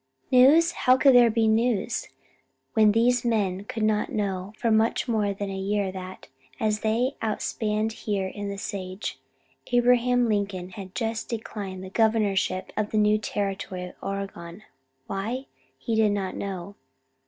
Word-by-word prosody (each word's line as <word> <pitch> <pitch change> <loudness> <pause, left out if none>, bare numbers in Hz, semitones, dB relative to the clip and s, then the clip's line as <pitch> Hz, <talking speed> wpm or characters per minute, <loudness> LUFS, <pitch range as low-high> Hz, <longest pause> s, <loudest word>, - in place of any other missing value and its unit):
News? 290 +7 +6
How 255 -5 +3
could 270 0 +6
there 245 -1 +7
be 225 0 +2
news, 225 -1 +1 0.7
when 215 -2 +5
these 240 +3 +3
men 205 -5 0
could 220 +1 -4
not 215 -1 +1
know 195 -2 -2
for 230 - 0
much 220 +3 +2
more 215 -4 +1
than 200 0 -4
a - - -4
year 195 0 -1
that, 185 0 -9 0.3
as 215 -1 +1
they 230 +5 0
outspanned 215 0 -1
here 205 -3 -2
in 205 +1 -5
the 200 - -5
sage, 190 0 -5 0.5
Abraham 245 0 +3
Lincoln 200 -4 -2
had 190 0 -9
just 225 -1 -2
declined 205 -5 -5
the 190 - -9
governorship 205 -4 +1
of 210 0 -1
the 215 - -1
new 210 0 +4
territory 195 -3 -3
of - - -16
Oregon? 195 -1 -6 0.4
Why? 225 - -3 0.3
He 230 - -3
did 220 -2 +3
not 195 -2 -3
know. 195 0 -5
210 Hz, 155 wpm, -26 LUFS, 195-230 Hz, 0.7 s, there